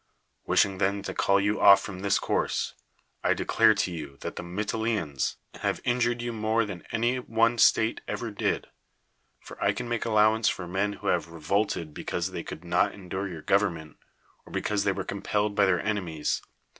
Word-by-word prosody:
Wishing 95 Hz, -2 st, +3 dB
then 100 Hz, 0 st, +1 dB
to -, -, -4 dB
call 100 Hz, 0 st, +3 dB
you 105 Hz, +2 st, 0 dB
off 100 Hz, -1 st, +9 dB
from 95 Hz, -2 st, -7 dB
this 100 Hz, +1 st, +2 dB
course, -, -, -1 dB, 0.5 s
I -, -, +3 dB
declare 110 Hz, -1 st, +4 dB
to 90 Hz, -, 0 dB
you 75 Hz, -5 st, -7 dB
that -, -, -5 dB
the -, -, -4 dB
]\lytilenoans 100 Hz, -, -2 dB, 0.3 s
have -, -, 0 dB
in 125 Hz, 0 st, +1 dB
jured 120 Hz, 0 st, +1 dB
you 120 Hz, 0 st, -3 dB
more 110 Hz, +1 st, +1 dB
than 95 Hz, -4 st, -7 dB
any 120 Hz, +3 st, +1 dB
one 115 Hz, -1 st, +1 dB
state 110 Hz, +1 st, +4 dB
ever 115 Hz, -2 st, -3 dB
did. 100 Hz, -, -1 dB, 0.8 s
For -, -, -8 dB
I -, -, +3 dB
can 125 Hz, -, -5 dB
make 120 Hz, -2 st, -1 dB
ajlowance 110 Hz, 0 st, +3 dB
for 90 Hz, -, -4 dB
men 100 Hz, +3 st, -1 dB
wlio -, -, +1 dB
have 85 Hz, -2 st, -1 dB
revolted 85 Hz, 0 st, -1 dB
because -, -, -3 dB
they -, -, -4 dB
could 80 Hz, +3 st, -9 dB
not 90 Hz, 0 st, +2 dB
er.dure 95 Hz, 0 st, -4 dB
your 85 Hz, -4 st, -8 dB
government, 85 Hz, -7 st, 0 dB, 0.5 s
or -, -, -15 dB
because 105 Hz, -1 st, -1 dB
they 100 Hz, -, +3 dB
were 95 Hz, 0 st, -3 dB
compelled 105 Hz, +2 st, -1 dB
by 100 Hz, -1 st, +4 dB
their 90 Hz, -2 st, +3 dB
enemies. 90 Hz, -8 st, -1 dB
100 Hz, 185 wpm, -27 LUFS, 90-110 Hz, 0.8 s, off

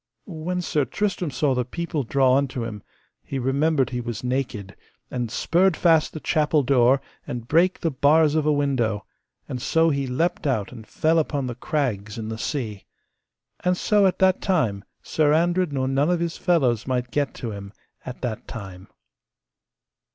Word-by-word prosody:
When 180 Hz, +1 st, -4 dB
Sir 150 Hz, -3 st, +1 dB
Tristram 180 Hz, -, -2 dB
saw 140 Hz, 0 st, +1 dB
the 125 Hz, -1 st, 0 dB
people 165 Hz, +4 st, -3 dB
draw 130 Hz, +1 st, +3 dB
unto 135 Hz, -4 st, -1 dB
him, 105 Hz, -3 st, -6 dB, 0.4 s
he 135 Hz, -, -5 dB
remembered 135 Hz, +2 st, +1 dB
he 125 Hz, -1 st, -2 dB
was 120 Hz, -2 st, -5 dB
naked, 125 Hz, -6 st, -3 dB, 0.4 s
and 120 Hz, -2 st, -2 dB
sperd 175 Hz, -, +2 dB
fast 165 Hz, -3 st, +3 dB
the 155 Hz, -, -5 dB
chapel 150 Hz, -1 st, +2 dB
door, 130 Hz, 0 st, +3 dB, 0.2 s
and 120 Hz, -1 st, -5 dB
brake 175 Hz, +6 st, +3 dB
the 165 Hz, -, -1 dB
bars 150 Hz, +3 st, +4 dB
of 155 Hz, -1 st, +1 dB
a -, -, +4 dB
window, 130 Hz, -8 st, 0 dB, 0.4 s
and 125 Hz, -, -5 dB
so 165 Hz, +4 st, +3 dB
he 140 Hz, -2 st, -1 dB
leapt 155 Hz, +5 st, -1 dB
out 110 Hz, -8 st, -1 dB
and 115 Hz, -3 st, -11 dB
fell 160 Hz, +1 st, +2 dB
upon 145 Hz, -3 st, -1 dB
the 125 Hz, -, -3 dB
crags 120 Hz, -6 st, -2 dB
in 110 Hz, -1 st, -5 dB
the 110 Hz, 0 st, -5 dB
sea. 110 Hz, -8 st, -4 dB, 0.8 s
And 180 Hz, 0 st, +2 dB
so 205 Hz, 0 st, +3 dB
at 185 Hz, -, 0 dB
that 190 Hz, -1 st, +3 dB
time 120 Hz, -, 0 dB, 0.2 s
Sir 150 Hz, -1 st, +2 dB
Andred 175 Hz, +1 st, +1 dB
nor 130 Hz, -2 st, -1 dB
none 135 Hz, +4 st, +1 dB
of 175 Hz, -1 st, +1 dB
his 170 Hz, -1 st, -2 dB
fellows 130 Hz, -, +1 dB
might 125 Hz, -1 st, -1 dB
get 145 Hz, -2 st, -1 dB
to 115 Hz, -, -5 dB
him, 100 Hz, -1 st, -8 dB, 0.3 s
at 125 Hz, -, -8 dB
that 120 Hz, -4 st, -4 dB
time. 95 Hz, -4 st, -8 dB
140 Hz, 175 wpm, -24 LUFS, 120-160 Hz, 0.8 s, bars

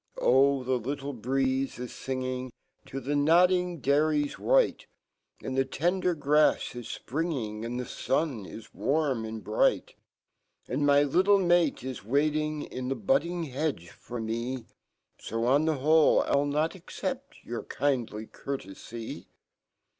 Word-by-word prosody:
j^t -, -, -6 dB
"Oh! 135 Hz, +1 st, +4 dB
the 130 Hz, 0 st, 0 dB
little 140 Hz, +4 st, -4 dB
breeze 130 Hz, +2 st, -1 dB
is 125 Hz, -1 st, -6 dB
finging 130 Hz, -1 st, -4 dB, 0.4 s
TO 135 Hz, -, -5 dB
the 140 Hz, +2 st, -2 dB
nodding 175 Hz, +3 st, +3 dB
dailies 145 Hz, +1 st, +1 dB
white -, -, +2 dB, 0.6 s
And 130 Hz, -, -3 dB
fhe/tendergrafs 150 Hz, 0 st, +1 dB
is 120 Hz, -2 st, -6 dB
fpringing, 125 Hz, -8 st, -2 dB
And 120 Hz, +2 st, -3 dB
fhe/ 125 Hz, -, -7 dB
^un 135 Hz, -, 0 dB
is 115 Hz, -, -11 dB
warm 140 Hz, -6 st, 0 dB
and 110 Hz, 0 st, -6 dB
bright; 110 Hz, -, +1 dB, 0.7 s
And 145 Hz, +3 st, 0 dB
my 145 Hz, 0 st, +6 dB
little 185 Hz, +8 st, +4 dB
mate 175 Hz, -7 st, +2 dB
is 130 Hz, -4 st, -6 dB
waiting 150 Hz, +5 st, 0 dB
In 125 Hz, 0 st, -5 dB
fho 135 Hz, +10 st, -4 dB
budding 175 Hz, -9 st, +1 dB
hedge 135 Hz, -, -3 dB
forme/; 120 Hz, +1 st, -4 dB, 0.7 s
$o,on 125 Hz, +7 st, +2 dB
fhe 155 Hz, -4 st, +1 dB
who[e,Pll 145 Hz, -1 st, +4 dB, 0.2 s
nt 165 Hz, -, -5 dB
accept 270 Hz, -, -6 dB
YQUP 120 Hz, 0 st, -6 dB
kindly 120 Hz, -6 st, -1 dB
courtefy." 115 Hz, -2 st, -7 dB
140 Hz, 125 wpm, -28 LUFS, 125-155 Hz, 0.7 s, my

